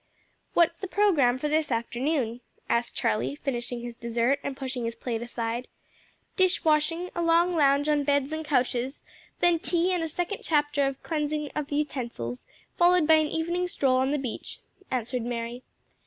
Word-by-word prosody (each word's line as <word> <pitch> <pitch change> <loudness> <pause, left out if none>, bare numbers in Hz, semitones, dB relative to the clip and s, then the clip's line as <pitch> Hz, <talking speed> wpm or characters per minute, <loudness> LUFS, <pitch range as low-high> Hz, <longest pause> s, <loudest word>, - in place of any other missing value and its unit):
"What's 335 0 +3
the 385 - -4
programme 330 -12 +3
for 300 - -2
this 305 -1 +1
afternoon?" 240 +1 -1 0.3
asked 235 0 0
Charlie, 215 +6 0
finishing 245 -4 -3
his 240 0 -6
dessert 235 +4 0
and 275 -1 -4
pushing 260 -2 -4
his 230 0 -3
plate 230 -3 -3
aside. 235 0 -3 0.7
"Dish 370 -2 +2
washing, 320 +3 +2
a 345 - -2
long 340 +1 +3
lounge 285 -1 +3
on 295 -1 +2
beds 285 +1 +1
and 315 0 -3
couches, 255 -2 0 0.4
then 345 -1 +4
tea 350 +2 +1
and 355 - 0
a 325 - -2
second 355 +5 -2
chapter 295 -2 +2
of 275 -1 -5
cleansing 300 -2 -2
of 300 -1 -3
utensils, 240 - -3 0.3
followed 350 -1 +5
by 320 - +6
an 310 -1 +2
evening 345 +3 -1
stroll 265 -7 +2
on 260 +1 +2
the 295 - +1
beach," 260 -5 -5 0.3
answered 250 0 -2
Mary. 235 +1 -4
285 Hz, 170 wpm, -27 LUFS, 245-320 Hz, 0.7 s, by